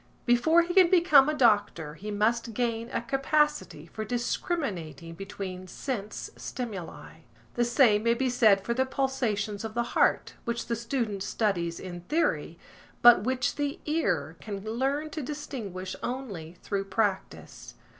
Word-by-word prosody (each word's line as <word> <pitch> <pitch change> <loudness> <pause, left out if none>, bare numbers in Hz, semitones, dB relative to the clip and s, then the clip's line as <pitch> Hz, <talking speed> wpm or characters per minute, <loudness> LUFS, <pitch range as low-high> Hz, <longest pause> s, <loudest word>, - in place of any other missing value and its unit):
Before 260 +8 +4
he 350 +1 -3
can 370 -2 +6
become 310 -6 +6
a - - +1
doctor, 205 - +2
he 205 +7 -8
must 225 +2 0
gain 230 -1 -1
a 230 - -3
capacity 275 - 0
for 215 +6 -6
discriminating 210 - -3
between 190 0 -7
sense 210 +1 -5
stimuli. 215 -9 -7 0.4
The 240 - +1
same 240 -4 +4
may 235 +1 +2
be 260 +2 0
said 220 -6 +4
for 235 - 0
the 260 +2 0
pulsations 230 -7 -1
of 220 0 -6
the 240 - +1
heart, - - +2
which 235 -1 -3
the 235 - -1
student 230 -4 -2
studies 180 -5 -1
in 175 -2 -7
theory, 330 +2 0 0.5
but 235 -4 +8
which 255 0 0
the 290 -1 -2
ear 180 - -1
can 200 -2 -6
learn 275 +7 -1
to 310 - -4
distinguish 240 -10 -6
only 200 -11 -5
through 195 -1 -2
practice. 195 0 -3
230 Hz, 145 wpm, -28 LUFS, 195-265 Hz, 0.5 s, but